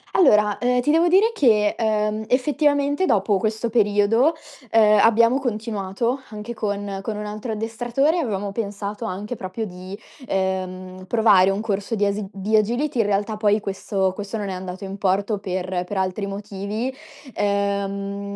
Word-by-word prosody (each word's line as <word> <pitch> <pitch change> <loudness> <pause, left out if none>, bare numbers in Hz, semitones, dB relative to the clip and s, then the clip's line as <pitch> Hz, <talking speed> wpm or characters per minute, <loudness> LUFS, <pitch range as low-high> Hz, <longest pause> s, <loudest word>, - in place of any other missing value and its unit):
Allora, 210 - +5
uhm, 250 0 +2
ti 295 - +1
devo 330 +2 +4
dire 395 +6 +4
che, 215 - +3
uhm, 215 -1 0
effettivamente 285 +4 +1
dopo 205 -4 +2
questo 220 +2 -2
periodo, 220 +7 +3 0.4
uhm, 215 -1 +5
abbiamo 230 +3 +4
continuato 225 0 -2
anche 215 +2 -7
con 205 -2 -3
con 210 +1 -4
un 210 - -5
altro 215 +2 -5
addestratore, 240 +9 0
avevamo 205 - -2
pensato 205 0 -4
anche 210 +3 -4
proprio 200 +2 -5
di, 185 +1 -9 0.3
ehm, 185 -1 -3
provare 200 -4 +5
un 195 +2 -1
corso 210 +1 -2
di 205 - +1
as 200 +1 -1
di 200 +3 -1
agility. 240 +6 +1
In 220 - +3
realtà 205 +1 -1
poi 210 0 +2
questo 195 -1 -1
questo 205 +3 -5
non 205 -2 -4
è - - -3
andato 185 +1 -7
in 195 +1 -6
porto 200 +2 0
per 185 -2 -3
per 195 +2 -5
altri 190 +2 -1
motivi. 205 +4 -4 0.4
Uhm, 200 0 -2
210 Hz, 155 wpm, -22 LUFS, 195-230 Hz, 0.4 s, Allora